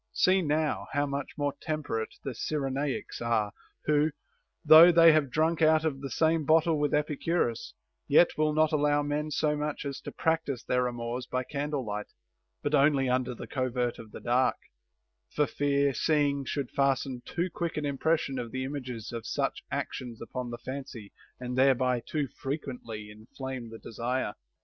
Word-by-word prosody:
See 185 +1 +4
now 155 -1 0
how 145 +1 +2
much 140 -1 -5
more 145 -1 0
temperate 145 -8 -3
the 135 - -3
Cyrenaics 135 +1 -3
are, 115 -3 +1 0.3
who, 150 0 +3 0.6
though 160 +3 +10
they 165 -1 +8
have 155 -3 +2
drunk 160 +4 +1
out 155 0 +4
of 135 -4 -1
the 135 - -5
same 160 +1 +2
bottle 160 +1 +3
with 145 -1 +1
Epicurus, 150 -4 -1 0.3
yet 160 +4 +5
will 155 0 +2
not 155 0 +3
allow 145 -1 +2
men 150 +1 -2
so 150 0 +1
much 150 0 -3
as 140 -1 -4
to - - -7
practise 160 -6 -1
their 125 0 +1
amours 120 +1 -4
by 130 0 -1
candle 145 0 -3
light, 105 0 -4 0.6
but 145 - -1
only 140 -2 +4
under 125 -1 0
the - - -7
covert 125 -2 -2
of 110 - -10
the - - -8
dark, 125 +2 +2 0.8
for 150 - +3
fear 140 +2 +1
seeing 145 -1 +1
should 135 -1 -3
fasten 135 -2 0
too 175 +1 -2
quick 170 -2 -3
an 150 - -1
impression 140 -1 0
of 120 -1 -4
the 130 +2 -3
images 130 -5 -5
of 115 -1 -6
such - - -1
actions 120 -3 -4
upon 125 +1 -5
the 120 - -5
fancy 130 -6 -7 0.3
and 125 0 -4
thereby 130 -2 +3
too 150 -3 -2
frequently 125 -6 -6
inflame 125 +3 -7
the 115 - -9
desire. 115 0 -3
140 Hz, 170 wpm, -29 LUFS, 125-150 Hz, 0.8 s, though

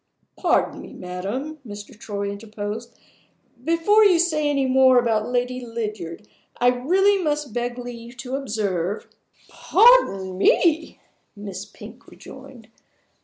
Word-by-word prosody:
"Pardon - - 0
me, - - -11
madam," 200 +12 -5
Mr. 205 -2 -10
Troy 200 -1 -4
interposed. 215 +2 -7 0.7
"Before 335 +8 +4
you 380 -4 +5
say 310 -3 +1
any 275 -2 +1
more 260 0 +5
about 225 -3 +1
Lady 250 +1 -1
Lydiard, 210 -5 -6 0.3
I 245 - +4
really 370 +11 +2
must 295 -5 -2
beg 240 0 -3
leave 240 0 -9
to 250 +1 -7
observe 205 -7 -2 0.2
" - - -32
"Pardon 195 - +3
me," 320 - +2 0.4
Miss 200 -2 -7
Pink - - -14
rejoined. 260 -4 -13
245 Hz, 120 wpm, -23 LUFS, 210-290 Hz, 0.7 s, you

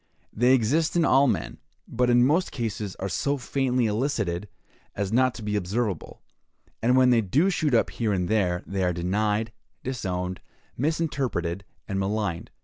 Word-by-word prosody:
They 125 +4 +4
exist 145 +9 +1
in 170 -1 +3
all 135 +2 +5
men, 105 -9 -2 0.3
but 125 +1 0
in 120 0 +5
most 165 +7 +2
cases 110 -5 -4
are 95 - -4
so 140 +9 -1
faintly 130 -1 0
elicited 105 -5 -1 0.5
as 100 +1 -2
not 130 0 +3
to 115 - -8
be 105 0 -2
observable; 100 -1 -2 0.6
and 125 +3 +3
when 130 -1 +5
they 120 -2 +4
do 145 - +2
shoot 155 -7 +1
up 115 - +2
here 115 -3 -1
and 90 -3 0
there, 90 -4 +1
they 100 -1 -3
are 90 -1 +1
denied, 105 +5 0 0.3
disowned, 90 -8 -3 0.3
misinterpreted, 130 - -1 0.2
and 100 -2 -2
maligned. 100 -3 -2
110 Hz, 160 wpm, -26 LUFS, 95-130 Hz, 0.6 s, all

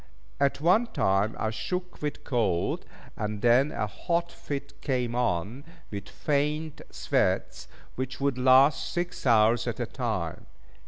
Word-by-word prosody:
At 140 0 +2
one 185 +10 +4
time 95 - +1
I 110 - -1
shook 180 +12 -4
with 150 -1 -3
cold, 105 -10 0 0.3
and 105 0 -4
then 125 +5 +5
a 105 - -1
hot 170 - -2
fit 140 -1 -6
came 125 -4 -1
on, 120 +1 -1 0.3
with 100 -2 -6
faint 150 +1 -1
sweats, - - 0 0.3
which 130 +1 -4
would 140 -2 +1
last 130 +3 +5
six 175 -5 -3
hours 115 0 +4
at - - -3
a - - 0
time. - - -3
130 Hz, 140 wpm, -28 LUFS, 110-150 Hz, 0.3 s, then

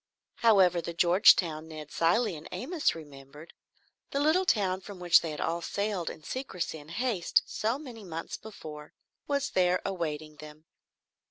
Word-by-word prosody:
However, 190 -6 +4
the 170 0 -6
Georgetown 170 -3 +4
Ned 155 -2 -9
Cilley 185 +4 +2
and 155 +1 -10
Amos 315 - -1
remembered, 145 0 -12 0.6
the 280 - -1
little 315 +6 +3
town 190 - +1
from 195 -1 -10
which 175 -1 +5
they 165 - -4
had 150 - -6
all 170 +1 -1
sailed 200 -1 -2
in 155 - -10
secrecy 180 - -4
and 145 +1 -14
haste 205 -1 +1
so 225 +4 -1
many 250 -7 -10
months 165 -3 -6
before, 155 -8 -10 0.3
was 280 -1 -1
there 180 0 +3
awaiting 155 -5 -4
them. 150 +1 -12
175 Hz, 155 wpm, -29 LUFS, 155-215 Hz, 0.6 s, which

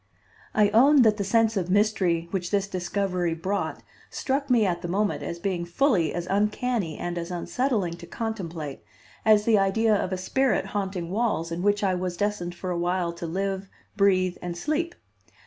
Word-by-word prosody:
I 210 -1 +5
own 265 +6 +6
that 215 -2 +4
the 200 - -1
sense 225 +2 +2
of 180 -3 -1
mystery 185 -4 +2
which 180 -2 -2
this 200 -1 +1
discovery 180 -2 -1
brought 190 +5 -3 0.3
struck 275 +1 -2
me 235 -4 +4
at 175 -2 -1
the 175 - -4
moment 200 +4 0
as 170 - -4
being 175 -1 -2
fully 175 - +2
as 175 -1 -3
uncanny 210 -2 0
and 175 0 -3
as 170 +1 -5
unsettling 195 +1 -1
to - - -11
contemplate 170 - -5 0.5
as 215 -1 +5
the 220 -3 +4
idea 215 +3 +2
of 195 - -1
a 185 - -1
spirit 260 +7 +1
haunting 190 -4 -3
walls 200 -6 0
in 170 +1 -3
which 205 +1 +2
I 190 -2 +2
was 180 -1 -3
destined 205 -4 -2
for 180 +1 -4
a 175 - -1
while 175 0 0
to 170 0 -6
live, 195 +2 -2 0.3
breathe 185 -3 +2
and 175 -1 -5
sleep. 320 - -1
195 Hz, 180 wpm, -26 LUFS, 175-215 Hz, 0.5 s, own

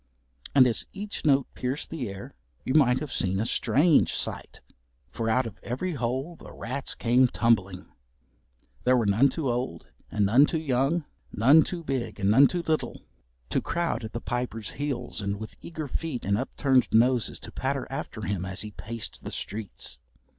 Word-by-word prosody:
And 130 -2 +8
as 120 -3 +1
each 205 -2 -6
note 140 -2 +4
pierced 130 +4 -3
the 135 -10 -3
air 100 0 -8 0.3
you 130 - 0
might 130 -5 +5
have 150 - -5
seen 95 +1 0
a 110 - 0
strange 150 +6 +3
sight. - - -1 0.5
For 115 -1 -2
out 125 +3 +2
of 115 - -8
every 130 +10 -3
hole 130 +5 -2
the - - -13
rats 140 - -4
came 125 +2 +4
tumbling. 100 -6 +1 1.0
There 125 0 +4
were 115 - +1
none 110 +8 +4
too 160 -4 -3
old 120 -9 -3 0.2
and 105 -1 +1
none 125 +9 +6
too 165 - -1
young, 145 +2 0 0.3
none 135 +9 +6
too 170 +1 -3
big 135 -7 -3
and 100 0 +2
none 135 +6 +7
too 175 -1 -3
little 160 -1 -2 0.5
to - - +1
crowd 170 -7 -1
at 110 - -7
the 115 - -3
Piper's 120 -4 -3
heels 130 -6 -3
and 100 0 -2
with 110 - -8
eager 160 -3 -6
feet 140 -1 -4
and 100 +1 +2
upturned 130 +2 +2
noses 120 +1 +3
to - - -8
patter - - -2
after - - -5
him 95 -2 -2
as 95 +2 -3
he 105 - -7
paced 110 +4 -5
the - - -5
streets. 90 - -5
125 Hz, 180 wpm, -27 LUFS, 110-145 Hz, 1.0 s, And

